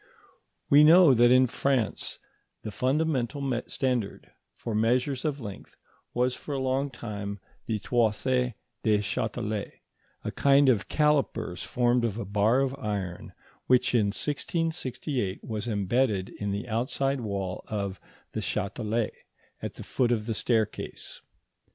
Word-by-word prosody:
We 145 +1 +8
know 165 -1 +8
that 120 0 +5
in 130 +1 +6
France 125 -2 -1 0.5
the 110 - -5
fundamental 140 +1 0 0.3
standard 125 -6 -2 0.2
for 115 - -5
measures 125 +5 +1
of 145 -2 -1
length 105 -6 -9 0.4
was 125 +1 +2
for 145 +2 -5
a - - -1
long 130 +2 0
time 105 -5 -6 0.3
the 110 - 0
Toise 110 -1 +1 0.6
du 110 -1 +3
Châtelet, 105 0 -2 0.5
a - - -3
kind 140 0 +4
of 110 -6 +2
callipers 150 - +1
formed 120 0 +2
of 110 -3 -1
a 115 - -3
bar 105 +6 +3
of 135 -1 0
iron 100 -7 -4 0.3
which 125 0 +3
in 110 -4 +4
1668 140 - -2
was 110 0 -4
embedded 105 -1 +1
in 105 - -5
the 100 +5 -3
outside 130 +4 0
wall 100 -4 -3
of 100 -3 -3 0.3
the - - -3
Châtelet, 110 +2 -1 0.5
at - - -5
the - - -8
foot 125 -2 0
of 110 -3 0
the 115 - -1
staircase. 110 -1 -2
120 Hz, 135 wpm, -28 LUFS, 105-135 Hz, 0.6 s, We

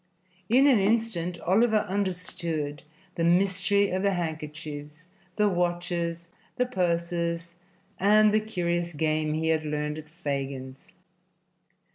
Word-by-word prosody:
In 260 +5 +5
an 265 -6 +6
instant 195 -5 0
Oliver 215 +4 +3
understood 175 -6 -2 0.3
the 165 - -2
mystery 195 +3 +3
of 185 +1 0
the 200 0 +2
handkerchiefs, 155 -2 -6 0.3
the 210 -1 +3
watches, 175 -2 -1 0.3
the 250 - +1
purses 170 -4 -1 0.5
and 210 +2 +5
the 215 - +5
curious 175 -5 -2
game 155 0 0
he 160 +1 0
had 160 -1 +2
learned 150 0 -2
at 155 -1 -12
Fagin's. 135 -5 -5
170 Hz, 115 wpm, -27 LUFS, 155-195 Hz, 0.5 s, an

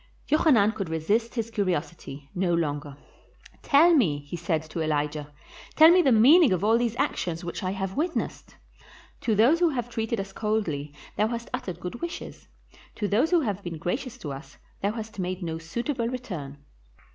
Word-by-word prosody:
Jochanan 270 -9 +4
could 195 -6 -5
resist 205 +10 0
his 230 -1 -2
curiosity 170 -8 -3
no 175 -1 +1
longer. 145 -3 -3 0.6
"Tell 320 +5 +5
me," 150 - +2
said 165 -2 -1
he - - -14
to 165 - -4
Elijah, 150 -1 -2 0.4
"tell 315 +2 +8
me 360 +1 +6
the 275 - +3
meaning 270 - +7
of 185 +1 -1
all 220 +2 +4
these 235 -2 -1
actions 175 -6 -2
which 170 - -5
I 185 - -2
have 195 0 -3
witnessed. 330 +4 -3 0.6
To 220 - 0
those 245 +11 +4
who 350 -1 +4
have 245 -5 -3
treated 225 -1 -2
us 195 0 -6
coldly 195 -11 -2 0.3
thou 215 - +3
hast 235 0 -5
uttered 175 -3 -4
good 180 +6 -6
wishes; 340 0 -7 0.5
to 210 - -2
those 225 +11 +2
who 350 -1 +4
have 205 -7 -2
been 175 -3 -6
gracious 225 - -3
to 145 - -6
us 135 +1 -10 0.2
thou 200 +2 0
hast 220 -2 -7
made 185 0 -3
no 160 -1 -3
suit 165 - -5
able 250 -6 -1
return. 180 - -6
200 Hz, 180 wpm, -26 LUFS, 165-235 Hz, 0.6 s, tell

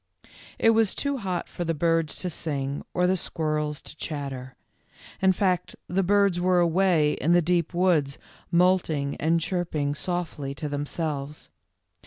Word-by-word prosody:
It 225 - +5
was 225 -3 +2
too 280 -1 -1
hot 185 -6 -3
for 175 - -5
the 165 -1 -1
birds 165 0 +1
to 180 - -2
sing 140 -3 -2
or 180 - +1
the 185 +1 +3
squirrels 155 -4 -2
to - - -9
chatter. 135 -5 -5 0.7
In 190 0 +5
fact, 185 -2 0
the 185 +2 +1
birds 200 -1 +3
were 180 0 +3
away 170 -3 +3
in 170 - +1
the 175 - +6
deep 170 0 +1
woods 170 -6 +2 0.3
moulting 170 -5 +2
and 165 +2 +2
chirp 175 0 -2
ing 145 -1 0
softly 150 -4 -3
to 150 - -4
themselves. 145 0 -4
165 Hz, 155 wpm, -26 LUFS, 150-180 Hz, 0.7 s, the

